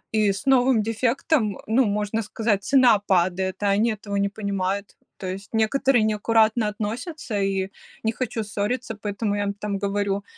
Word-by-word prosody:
и 215 -1 +3
с 200 - -7
новым 255 -3 +4
дефектом, 225 - 0
ну, 235 +4 +3
можно 210 +1 -1
сказать, 210 -1 -1
цена 250 -5 +5
падает, 185 +1 +1
а 200 - +3
они 225 +3 +2
этого 200 -1 -6
не 200 0 +1
понимают. 200 -1 -3 0.2
То 190 - -6
есть 195 +3 -7
некоторые 230 +2 +2
неаккуратно 220 +1 +2
относятся, 225 - -4
и 195 -1 0 0.3
не 225 - +1
хочу 230 -2 -3
ссориться, 220 +4 -2
поэтому 205 0 -2
я 205 - -1
им 200 - -1
там 200 -1 -4
говорю: 200 0 -1
210 Hz, 160 wpm, -24 LUFS, 200-230 Hz, 0.3 s, цена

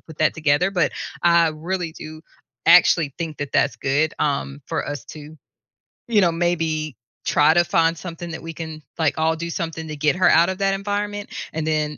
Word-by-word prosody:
put 160 -2 -14
that 155 - +2
together, 155 +4 +1
but 175 -4 +2 0.3
I 170 -1 +5
really 165 +2 -4
do 155 0 -10 0.5
actually 165 -4 +5
think 165 -3 -4
that 145 -2 -5
that's 140 - +2
good, 145 +4 0
um, 140 -1 -1
for - - -2
us 145 0 -5
to, 155 0 -11 0.7
you 220 -4 +3
know, 170 -2 +3
maybe 165 -4 -1 0.3
try 150 +2 +4
to 175 - +4
find 165 0 +2
something 170 0 -7
that 160 - -7
we 165 0 -6
can, 160 -1 -7 0.2
like, 160 -2 +1
all 160 +1 +2
do, 170 +1 -4
something 165 -2 -4
to 155 - -5
get 150 +3 +1
her 185 - +5
out 170 +2 +5
of 190 - -3
that 195 0 +1
environment, 205 +1 -3 0.2
and 160 -1 -2
then, 150 -1 -1
160 Hz, 195 wpm, -22 LUFS, 155-175 Hz, 0.7 s, I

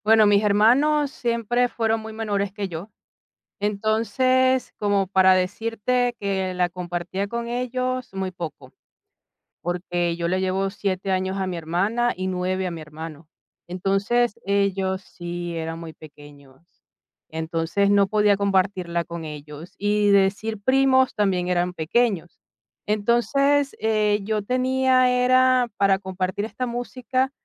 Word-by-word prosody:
Bueno, 220 0 +6
mis 205 0 +4
hermanos 265 +8 +3
siempre 240 0 0
fueron 225 -1 0
muy 220 0 -8
menores 205 -3 -2
que 200 0 -4
yo. 175 +3 -7 0.7
Entonces, 230 +5 +1
como 200 -2 +1
para 190 -1 +5
decirte 225 +6 0
que 190 -2 -1
la 180 -1 +1
compartía 180 +2 -4
con 235 +2 -4
ellos, 255 +1 -2
muy 190 -1 -2
poco, 175 -3 -8 0.9
porque 175 -1 -2
yo 170 0 -2
le 185 +1 0
llevo 190 +1 0
siete 195 -1 -3
años 190 0 -1
a 190 -1 -1
mi 180 -2 -3
hermana 200 +9 0
y 185 +1 -3
9 185 +1 -1
a 180 - -2
mi 165 - -6
hermano. 155 0 -9 0.4
Entonces, 195 +6 0
ellos 195 -1 0
sí 175 -1 -6
eran 165 0 -4
muy 165 -1 -8
pequeños. 145 -1 -17 0.5
Entonces, 165 +5 -1
no 200 -1 +4
podía 210 0 +3
compartirla 190 -3 0
con 170 0 -7
ellos 150 +2 -9
y 205 0 +2
decir 200 +2 +1
primos 260 +1 +3
también 185 -3 0
eran 180 0 0
pequeños. 180 +1 -1 0.5
Entonces, 270 +7 +2
eh, 215 -1 +2
yo 210 0 -1
tenía 255 +2 +2
era 255 0 +4
para 195 -1 +3
compartir 190 +1 -3
esta 250 +3 -4
música 255 +2 -2
200 Hz, 135 wpm, -23 LUFS, 180-235 Hz, 0.9 s, Bueno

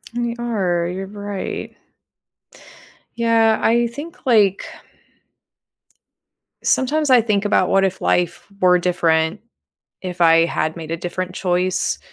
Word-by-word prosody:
We 235 -1 -2
are, 190 -8 -1
you're 185 +2 -5
right. 205 -1 -6 1.4
Yeah, 230 -1 +3
I 235 +1 +2
think 290 +8 -10
like 210 -6 +3 2.0
Sometimes 295 +3 +1
I 250 -3 +6
think 210 -2 0
about 195 -3 +2
what 195 0 +3
if 190 0 -3
life 175 0 0
were 180 -1 +5
different, 170 0 +1 0.6
if 180 -1 -6
I 165 0 +5
had 155 -1 -2
made 160 -2 -8
a - - -1
different 180 +1 -5
choice, 180 0 0
190 Hz, 120 wpm, -20 LUFS, 175-230 Hz, 2.0 s, I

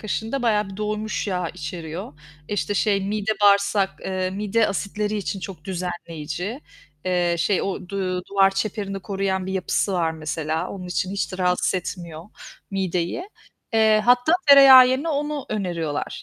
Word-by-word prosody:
kaşığında 225 +4 -3
bayağı 210 -3 +1
bir 190 - -9
doymuş 215 +1 -3
yağ 180 -3 -1
içeriyor. 165 0 -7 0.4
İşte, 205 0 -1
şey, 200 -1 +2
mide 205 +2 -1
bağırsak, 200 -1 +4
eee, 185 -1 -2
mide 210 +3 +1
asitleri 210 +1 -2
için 200 -1 -3
çok 180 -4 -8
düzenleyici. 175 - -5 0.4
Eee, 180 -2 +1
şey, 190 +3 +1
o 190 -2 -4
du 185 -2 -2
duvar 195 -1 +4
çeperini 195 0 -3
koruyan 190 -2 -2
bir 190 - -3
yapısı 190 +1 0
var 170 -3 +1
mesela. 160 0 -3
Onun 185 -2 -7
için 180 +1 -2
hiç 200 0 -3
de 185 - -6
rahatsız 180 0 +1
etmiyor 170 -3 -5 0.5
mideyi. 190 - -2 0.4
Eee, 220 -1 +4
hatta 245 +5 +4 0.2
tereyağı 270 -2 +10
yerine 265 +5 0
onu 295 -1 -2
öneriyorlar. 170 -8 -3
195 Hz, 150 wpm, -23 LUFS, 180-215 Hz, 0.5 s, tereyağı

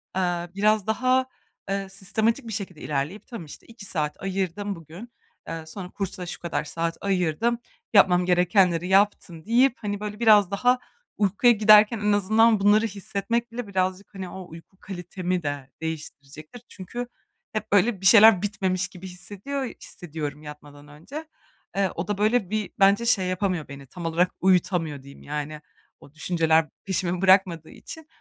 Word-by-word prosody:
Eee, 175 -2 -1
biraz 215 0 +2
daha, 255 +4 +2 0.4
eee, 195 0 -2
sistematik 220 +6 -1
bir 225 - -5
şekilde 190 -6 -6
ilerleyip, 150 +8 -3
"Tamam, 230 -10 -8
işte, 150 - -13
2 225 -3 -12
saat 150 -5 -3
ayırdım 195 +1 -2
bugün, 170 +8 -12 0.4
eee, 165 -1 -6
sonra 180 +3 -8
kursa 190 -2 -5
şu 175 - -7
kadar 170 - -2
saat 165 +2 -3
ayırdım, 195 +5 0 0.3
yapmam 180 -3 +5
gerekenleri 180 -1 +3
yaptım," 190 -4 +1
deyip 240 +3 +4
hani, 205 -1 -3
böyle 210 0 -6
biraz 210 -5 +5
daha 245 +5 +2 0.4
uykuya 210 +4 +4
giderken 215 +1 +6
en 210 0 +1
azından 220 +2 +4
bunları 210 +3 +4
hissetmek 210 +4 -3
bile 235 -2 -5
birazcık, 190 +1 -2
hani, 190 -2 -6
o 190 -2 -9
uyku 165 +4 -14
kalitemi 180 -1 -4
de 145 -2 -4
değiştirecektir. 155 - -8
Çünkü 240 +6 -7 0.5
hep 215 0 -4
böyle 200 0 +3
bir 190 - -6
şeyler 220 -2 +8
bitmemiş 190 -3 -1
gibi 185 0 -11
hissediyor 200 +10 -6
hissediyorum 155 - -7
yatmadan 145 -1 -12
önce. 210 - -9 0.5
Eee, 195 -1 +1
o 170 +1 -4
da 205 -1 -2
böyle 215 -2 +1
bir 215 -1 -2
bence 200 +4 +4
şey 195 -6 +2
yapamıyor 185 -4 -1
beni, 140 -1 -11
tam 170 +3 -9
olarak 170 +2 +1
uyutamıyor 175 -6 +1
diyeyim, 140 0 -14
yani; 150 +1 -5 0.4
o 140 - -17
düşünceler 160 -1 +2 0.2
peşimi 180 -2 -1
bırakmadığı 185 -4 +3
için. 320 -1 -11
190 Hz, 155 wpm, -25 LUFS, 170-210 Hz, 0.5 s, şeyler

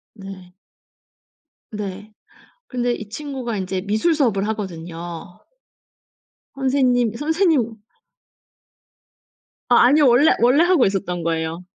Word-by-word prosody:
네. 190 -3 -11 1.2
네. 210 0 -7 0.6
근데 245 -1 -1
이 215 - -8
친구가 255 -2 -5
인제 185 -1 -3
미술 220 +12 +1
수업을 220 -9 0
하거든요. 175 -3 -7 1.2
선생님 255 -4 +1
선생님 295 - 0 1.9
아 240 - +6
아니요. 285 +1 +5
원래 250 +6 +5
원래 260 +8 +4
하고 350 -7 +3
있었던 190 -3 -2
거예요. 165 +1 -3
220 Hz, 210 characters per minute, -21 LUFS, 190-265 Hz, 1.9 s, 아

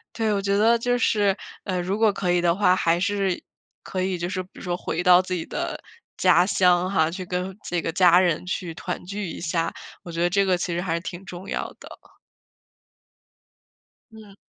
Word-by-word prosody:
对， 220 -2 0
我 205 - +1
觉 200 0 0
得 225 +3 +4
就 245 +1 0
是， 205 -4 +2 0.3
呃， 185 -2 -2
如 190 +3 -2
果 220 -2 +3
可 180 -3 -1
以 175 - +3
的 170 -1 +2
话， 185 -2 +4
还 170 -1 +2
是 195 -1 -1 0.4
可 185 -1 -3
以 190 0 -1
就 175 0 -3
是 185 -1 -3
比 185 - -22
如 - - -12
说 175 -1 -2
回 170 - -3
到 180 0 +7
自 185 - -4
己 175 -3 -2
的 - - -4 0.4
家 175 - +5
乡 180 -2 +3
哈， 160 -5 +2
去 185 +2 -6
跟 180 +2 -4
这 175 -1 -1
个 165 - -2
家 175 0 +6
人 175 -3 +1
去 180 -2 -4
团 180 +2 -5
聚 200 +1 -4
一 - - -8
下， 165 -1 -1 0.3
我 170 - -8
觉 165 - -3
得 175 - +3
这 200 +2 +2
个 185 -1 +3
其 175 0 -3
实 170 - -1
还 170 -3 -1
是 170 - 0
挺 180 +2 -8
重 185 +1 -9
要 - - -2
的。 - - -12 2.2
嗯。 215 -3 -14
180 Hz, 230 characters per minute, -24 LUFS, 175-195 Hz, 2.2 s, 到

